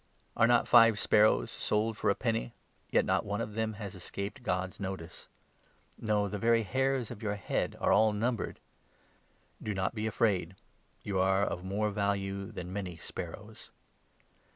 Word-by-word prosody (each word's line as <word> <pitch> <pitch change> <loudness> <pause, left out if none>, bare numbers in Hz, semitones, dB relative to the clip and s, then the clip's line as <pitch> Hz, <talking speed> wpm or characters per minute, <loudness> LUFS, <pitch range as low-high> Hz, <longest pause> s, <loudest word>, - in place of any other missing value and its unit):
Are 115 - +5
not 120 0 +4
five 115 -3 +7
sparrows 105 - +4
sold 110 +1 -1
for - - 0
a 100 - +3
penny? 115 0 -2 0.3
Yet - - +3
not - - +1
one 105 +1 -3
of 110 -2 -4
them 110 0 -1
has 100 -2 -7
escaped 100 +6 -6
God's 90 -5 -2
notice. 95 -4 -6 0.7
No, 105 -2 0
the 105 +1 -4
very 115 +1 +3
hairs 130 +2 0
of - - -8
your 105 -2 -1
head 100 - -2
are - - +3
all 110 +1 +5
numbered. 115 +2 -2 1.0
Do 105 - -3
not 95 +2 -1
be 110 -1 -2
afraid; 100 -5 0 0.5
you 100 -2 -1
are 95 +1 +3
of 90 - -2
more 105 +3 -1
value 100 -1 -2
than 90 +1 -7
many 95 -4 -4
sparrows. - - -8
105 Hz, 160 wpm, -31 LUFS, 95-110 Hz, 1.0 s, five